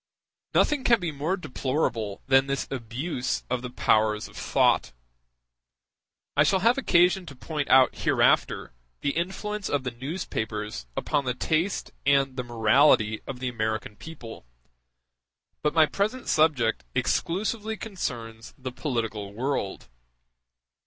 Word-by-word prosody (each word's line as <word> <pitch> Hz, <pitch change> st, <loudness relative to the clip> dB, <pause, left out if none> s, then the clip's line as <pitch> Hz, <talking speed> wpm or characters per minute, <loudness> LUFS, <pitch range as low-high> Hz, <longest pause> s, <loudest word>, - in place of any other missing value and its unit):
Nothing 290 Hz, -3 st, +3 dB
can 235 Hz, -3 st, +4 dB
be 175 Hz, -3 st, -2 dB
more 155 Hz, +6 st, -1 dB
deplorable 130 Hz, -, -2 dB
than 135 Hz, 0 st, +4 dB
this 140 Hz, 0 st, -2 dB
abuse 130 Hz, +2 st, -3 dB
of 125 Hz, -1 st, 0 dB
the 125 Hz, -, -5 dB
powers 110 Hz, -3 st, +2 dB
of -, -, -17 dB
thought; -, -, +2 dB, 1.4 s
I 145 Hz, -, +5 dB
shall 185 Hz, +5 st, +2 dB
have 235 Hz, +6 st, +4 dB
occasion 180 Hz, -4 st, +3 dB
to 140 Hz, -, -9 dB
point 150 Hz, +2 st, -4 dB
out 130 Hz, 0 st, +6 dB
hereafter -, -, +2 dB, 0.3 s
the 145 Hz, -, +1 dB
influence 195 Hz, +5 st, -3 dB
of 145 Hz, -2 st, 0 dB
the 125 Hz, -, -3 dB
newspapers 110 Hz, -, -4 dB
upon 145 Hz, -2 st, 0 dB
the 125 Hz, -1 st, -1 dB
taste 165 Hz, +8 st, -1 dB
and 135 Hz, -1 st, +3 dB
the 130 Hz, -, -2 dB
morality 115 Hz, -1 st, +3 dB
of 130 Hz, -2 st, -6 dB
the 130 Hz, -, -3 dB
American 110 Hz, -2 st, -3 dB
people, 115 Hz, -, -10 dB, 1.1 s
but 150 Hz, +1 st, 0 dB
my 160 Hz, -1 st, +7 dB
present 215 Hz, +10 st, -2 dB
subject 135 Hz, -, +2 dB
exclusively 215 Hz, +4 st, -1 dB
concerns 120 Hz, -, -6 dB
the 130 Hz, -2 st, -6 dB
political 115 Hz, -7 st, -3 dB
world. 125 Hz, -5 st, -2 dB
135 Hz, 130 wpm, -26 LUFS, 115-170 Hz, 1.4 s, my